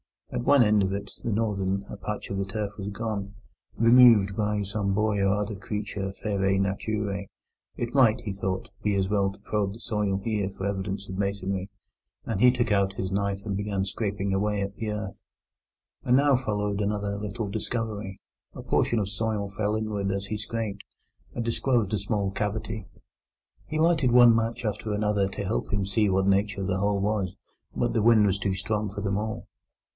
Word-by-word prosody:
At 120 - -3
one 140 -3 +6
end 105 -1 +4
of 95 0 0
it, 100 0 -4
the - - -1
northern, 100 -3 0
a - - -6
patch 105 -1 -5
of 100 - -2
the 100 - -1
turf 100 +1 -3
was 100 -1 -5
gone—removed 105 +1 +3
by 105 -1 0
some 100 0 -1
boy 105 -1 +1
or 100 0 +3
other 105 0 -2
creature 105 -1 -4
feraæ 95 -2 +1
naturæ. 100 0 -1 0.5
It 120 0 -3
might, 125 -4 +4
he 105 - -4
thought, 95 -1 -3
be 105 -1 +1
as 95 -1 +1
well 100 -2 +2
to 100 - -15
probe 100 -2 -1
the 110 - -11
soil 105 -4 -1
here 105 -3 0
for 95 0 -6
evidences 100 0 -3
of 95 - -5
masonry, 100 -1 -2 0.6
and 110 -4 -2
he 125 - +8
took 120 -2 0
out 100 -1 +2
his 95 -1 -3
knife 100 0 -1
and 100 -2 -2
began 100 -1 -1
scraping 100 -1 -2
away 100 0 0
the 110 +1 -3
earth. 105 -1 -5 0.8
And 125 - +3
now 140 0 +5
followed 105 -4 -1
another 100 0 -1
little 105 +1 -4
discovery: 105 -2 -3 0.4
a - - -7
portion 120 - +1
of 100 -2 0
soil 105 -1 -2
fell 105 +2 -1
inward 105 -2 -2
as 100 0 -3
he 105 - -2
scraped, 105 -2 -4 0.5
and 120 - -2
disclosed 115 -3 +1
a 105 - +1
small 100 0 -1
cavity. 105 0 -3 0.8
He 155 - -3
lighted 155 -5 +3
one 120 -1 +8
match 115 +1 -1
after 105 0 -2
another 105 -1 +1
to 100 +1 -5
help 100 +3 -2
him 100 -1 +1
to 95 - -4
see 105 +2 +2
of 95 - +1
what 95 0 +2
nature 100 +1 +2
the 95 0 0
hole 100 0 +1
was, 100 -3 -1 0.4
but - - 0
the 115 - +2
wind 110 -1 +6
was 100 -1 +1
too 95 -1 0
strong 105 +1 -1
for 100 +1 -6
them 100 -1 0
all. 110 +1 -3
105 Hz, 190 wpm, -27 LUFS, 100-110 Hz, 0.8 s, he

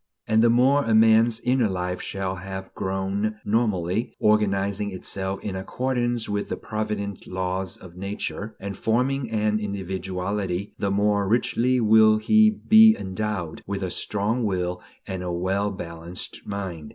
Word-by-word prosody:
And 110 0 +3
the 120 - +5
more 130 +5 +4
a 115 -3 +2
man's 110 +1 +5
inner 125 -2 +2
life 90 -1 -3
shall 95 -1 -3
have 95 +1 -7
grown 95 +3 -2
normally, 105 -2 0
organizing 100 -1 +1
itself 95 0 -4
in 100 - -3
accordance 120 +3 -1
with 105 0 -2
the - - -3
provident 105 -2 -4
laws 95 0 -3
of 90 -2 -13
nature, 100 +2 -5
and 100 -1 -5
forming 125 +4 0
an 110 -1 +1
individuality, 95 -1 -3
the 100 - 0
more 100 0 +1
richly 125 +2 +2
will 110 -1 +6
he 215 - +5
be 220 +1 +6
endowed 95 -3 -4
with 100 0 -3
a 90 - -2
strong 105 +4 -1
will 90 -3 -1 0.2
and 95 -1 -5
a 90 -1 -3
well 95 +4 0
balanced 85 -2 -6
mind. 95 -7 -5
100 Hz, 145 wpm, -24 LUFS, 95-110 Hz, 0.2 s, will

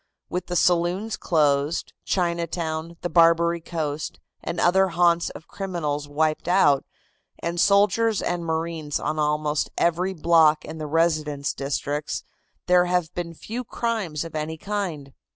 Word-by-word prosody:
With 180 0 -3
the 180 - -3
saloons 180 +5 +2
closed, 145 -1 +1
Chinatown, 170 -2 -2
the - - -1
Barbary 170 0 +4
Coast, 155 -3 -4 0.2
and 170 - -3
other 190 +3 +4
haunts 170 -1 +2
of 160 - -11
criminals 160 -7 -3
wiped 155 +2 0
out, 175 -7 +4 0.5
and 170 +1 -3
soldiers 205 +3 +3
and 175 -1 -2
marines 160 -2 -2
on 155 +1 -2
almost 150 0 0
every 180 +3 +1
block 160 -2 +4
in 160 - -8
the 155 - -4
residence 155 -3 0
districts, 145 +2 -3 0.4
there 180 0 +5
have 180 -2 0
been 170 -1 -5
few 235 +9 -5
crimes 220 -10 -2
of 165 - -9
any 155 +1 -3
kind. 170 -8 -4
170 Hz, 135 wpm, -24 LUFS, 155-180 Hz, 0.5 s, there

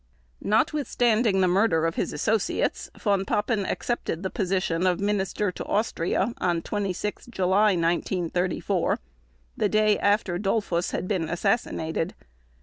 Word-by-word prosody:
Notwithstanding 235 -4 +2
the 185 - +4
murder 180 -3 +3
of 165 - 0
his - - -2
associates, 220 -2 0
Von 200 -3 +1
Papen 205 +1 0
accepted 195 -7 -2
the 190 - -2
position 185 -3 0
of 180 0 +1
Minister 200 0 0
to - - -7
Austria 205 0 0
on 175 -2 0
26 205 +1 -3
July 200 -1 +3
1934, 175 +1 0 0.6
the 210 - +1
day 215 0 +3
after 205 -3 +1
Dollfuss 195 -4 0
had 185 - -3
been 180 -6 -1
assassinated. 175 -3 -1
195 Hz, 125 wpm, -26 LUFS, 180-215 Hz, 0.6 s, the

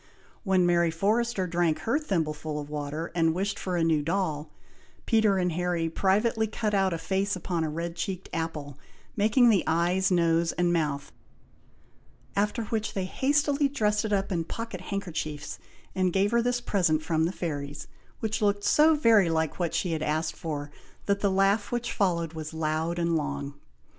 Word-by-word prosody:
When 190 -3 +3
Mary 170 -1 +3
Forrester 205 +4 0
drank 170 -2 0
her 235 +7 +1
thimbleful 155 - -2
of 145 0 -7
water, 150 +2 -4
and 165 -1 +2
wished 195 +2 -2
for 180 -2 -2
a 165 - +2
new 160 -2 +2
doll, 160 -2 -1 0.6
Peter 220 -4 +3
and 180 -1 +1
Harry 175 -1 -1
privately 215 +6 +1
cut 215 0 -2
out 195 -1 +2
a 165 - -1
face 195 +4 -1
upon 175 -2 -2
a 155 - -1
red 170 +2 -4
cheeked 185 +2 -4
apple, 150 -4 -4 0.4
making 225 +4 +4
the 200 - +3
eyes, 175 +4 +2
nose, 170 -2 +2
and 175 0 +1
mouth, 145 -4 -1 1.2
after 210 +3 0
which, 220 0 -3
they 190 -2 -1
hastily 285 +6 +1
dressed 210 -6 +1
it 220 - -3
up 195 0 0
in 170 -3 0
pocket 225 +1 -6
handkerchiefs, 170 -7 -4 0.3
and 185 -1 +1
gave 195 +2 +2
her 235 0 +3
this 245 0 0
present 170 -9 +1
from 160 -1 +1
the 170 - 0
fairies, 145 -5 -5 0.4
which 220 -1 -1
looked 205 -1 +1
so 310 +6 +5
very 225 - +4
like 160 0 -1
what 170 -3 -1
she 180 - 0
had 160 -1 -2
asked 155 +1 -1
for, 145 -3 -5 0.3
that 200 0 +1
the 200 - +2
laugh 195 +2 +2
which 240 0 -2
followed 170 -5 0
was 160 0 -6
loud 160 +2 -1
and 170 -1 +1
long. 145 -2 -3
180 Hz, 175 wpm, -27 LUFS, 160-205 Hz, 1.2 s, so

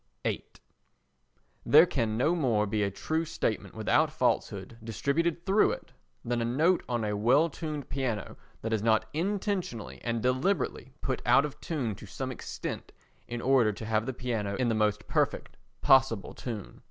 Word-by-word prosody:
viii - - -1 1.2
There 155 +4 +7
can 115 -9 -1
no 150 +8 +3
more 120 -11 +2
be 105 +1 -1
a 100 - +2
true 160 - -2
statement 135 -9 -2
without - - +2
falsehood 115 - -1
distributed 155 - -1
through 200 +2 +4
it, - - -9 0.3
than 120 0 0
a - - +1
note 155 +10 +2
on 120 -2 0
a 105 -1 -1
well 130 +10 +3
tuned 150 -3 -5
piano 125 -7 -3 0.3
that 110 0 -1
is 110 - +1
not 110 0 +3
intentionally 185 - -2
and 115 -1 -1
deliberately 130 +2 0
put 130 -3 -2
out 125 +4 +5
of 145 -1 -8
tune 140 - -2
to 105 - -11
some 130 +8 -4
extent 125 - -6 0.4
in 120 0 -4
order 130 -5 +4
to 110 +2 -7
have 110 +1 0
the - - 0
piano 115 -5 -2
in 125 0 +1
the - - +2
most 105 -1 0
perfect - - 0 0.3
possible 130 -6 +4
tune. 110 -5 -7
125 Hz, 165 wpm, -29 LUFS, 110-150 Hz, 1.2 s, There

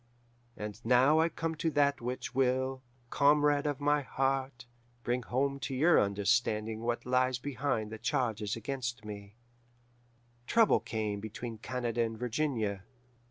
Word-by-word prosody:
"And 105 +1 -7
now 130 +6 +5
I 165 +1 +3
come 165 0 -3
to 160 +1 -1
that 145 -3 +2
which 125 +2 -4
will, 130 0 +1 0.3
comrade 145 0 +3
of 145 -2 -2
my 145 0 +2
heart, 135 -2 -2 0.4
bring 120 +1 0
home 135 +3 -1
to 135 -1 -4
your 165 +6 +5
understanding 110 +2 0
what 120 0 -2
lies 125 0 +2
behind 130 -5 -2
the 110 - -7
charges 115 -5 -1
against 120 -2 -4
me: 100 -1 -9 1.1
"Trouble 230 -2 +4
came 105 -3 -3
between 110 +2 -7
Canada 120 0 -2
and 115 -1 -1
Virginia. 115 -5 -1
125 Hz, 135 wpm, -31 LUFS, 110-140 Hz, 1.1 s, now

